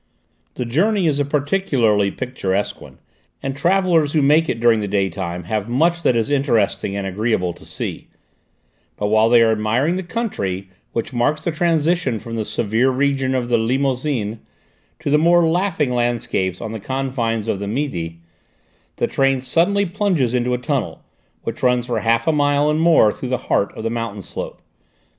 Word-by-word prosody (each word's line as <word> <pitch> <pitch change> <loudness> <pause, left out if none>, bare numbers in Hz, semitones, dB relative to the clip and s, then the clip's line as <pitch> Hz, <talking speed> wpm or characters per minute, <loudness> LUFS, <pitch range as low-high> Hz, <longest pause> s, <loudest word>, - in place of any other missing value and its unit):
The 125 - -3
journey 190 - +1
is 145 -3 +1
a 145 - +1
particularly 140 - +1
picturesque 100 -3 -3
one, - - -13 0.5
and 135 0 -3
travellers 170 -1 +2
who 155 -3 +3
make 155 +3 +4
it 115 - -1
during 115 -1 +4
the 105 - -2
daytime 95 -3 -2
have 105 +4 -3
much 170 +7 +2
that 125 - +2
is 115 +4 0
interesting 120 -8 +1
and 100 - -3
agreeable 95 -2 -1
to - - -17
see; - - -5 0.9
but 105 - -1
while 110 +1 +4
they 120 -1 +6
are 115 - +3
admiring 115 +10 +1
the - - -2
country, 100 - -3 0.2
which 115 +2 -3
marks 145 +6 0
the 170 - 0
transition 165 -4 +1
from 115 +2 -7
the 110 -1 -2
severe 115 +5 +1
region 135 0 0
of 125 -2 -1
the 120 -1 +2
Limousin 125 -2 -1 0.6
to 155 -2 -3
the 150 - +5
more 170 +1 +4
laughing 170 -5 0
landscapes 120 -6 -1
on 110 - -5
the 110 - -5
confines 120 -2 -2
of 100 - -1
the 100 - -4
Midi, 90 - -3 0.7
the - - 0
train 135 -1 +1
suddenly 170 +10 +2
plunges 170 - 0
into 125 0 +1
a - - -2
tunnel 125 - -3 0.4
which - - -5
runs 125 -1 +2
for 120 -1 -1
half 115 0 +1
a - - +3
mile 145 0 +2
and 155 +1 0
more 165 -10 +5
through 125 - -6
the 125 - +1
heart 100 - 0
of - - -6
the 115 - -1
mountain 115 -4 -4
slope. - - -7
125 Hz, 180 wpm, -20 LUFS, 110-150 Hz, 0.9 s, they